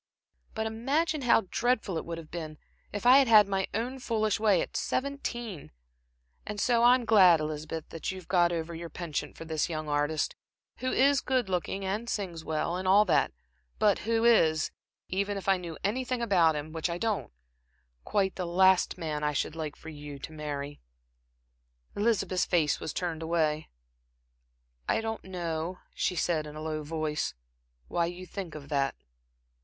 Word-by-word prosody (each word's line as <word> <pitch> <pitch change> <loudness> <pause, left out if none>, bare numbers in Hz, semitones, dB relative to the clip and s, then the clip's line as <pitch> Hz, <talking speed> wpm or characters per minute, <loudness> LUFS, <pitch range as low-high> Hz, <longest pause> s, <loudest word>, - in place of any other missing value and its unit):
But 220 - -1
imagine 280 +8 0
how 245 -3 +5
dreadful 240 -6 +1
it 160 - -3
would 170 0 -5
have 160 -2 -10
been, 155 -3 -6 0.3
if 205 +3 -5
I 255 +3 +9
had 270 - +4
had 215 -3 +7
my 195 -1 0
own 245 +5 -3
foolish 215 -4 0
way 210 -5 +4
at - - -5
seventeen. 240 - -3 0.7
And 210 - -5
so 235 +1 +3
I 245 +1 +7
am 250 -2 -2
glad, 190 -7 +7
Elizabeth, 155 +1 -4
that 165 - -4
you 190 - -7
have 185 - -11
got 175 -2 +3
over 170 0 -3
your 170 0 -6
penchant 155 -4 -4
for 165 - -8
this 160 0 -1
young 155 -2 -4
artist, 145 +1 0 0.4
who 255 0 -2
is 275 +1 +4
good 255 -6 0
looking, 190 +2 -2
and 210 +5 -2
sings 175 -7 -3
well, 160 +3 -1
and 185 0 -3
all 200 +3 +6
that; 180 - +2 0.5
but 205 -2 +3
who 225 +1 +1
is 160 -10 +4 0.4
even 200 +2 -1
if 195 - -7
I 195 -1 +4
knew 170 -3 -7
anything 250 +5 -1
about 180 -9 +3
him, 150 +1 -5
which 160 +1 -1
I 170 - -2
don't 220 +1 -1 0.7
quite 195 -2 0
the 180 -2 -2
last 190 +2 +4
man 155 -3 -3
I 150 0 +1
should 150 - -1
like 155 -3 -4
you 145 -2 -8
to 145 +3 -8
marry." 145 -2 -5 1.1
Elizabeth's 200 -4 +1
face 160 -5 +2
was - - -4
turned 165 -2 -3
away. 160 -2 0 1.2
"I - - +3
don't 225 0 -4
know," 175 -1 -3 0.2
she 180 - -1
said 160 -3 0
in 150 - -9
a 155 - -6
low 155 -1 -3
voice, 150 - -2 0.5
"why 170 -1 0
you 175 +1 -7
think 185 -3 -6
of 145 -2 -8
that." 140 -2 0
180 Hz, 175 wpm, -29 LUFS, 155-215 Hz, 1.2 s, I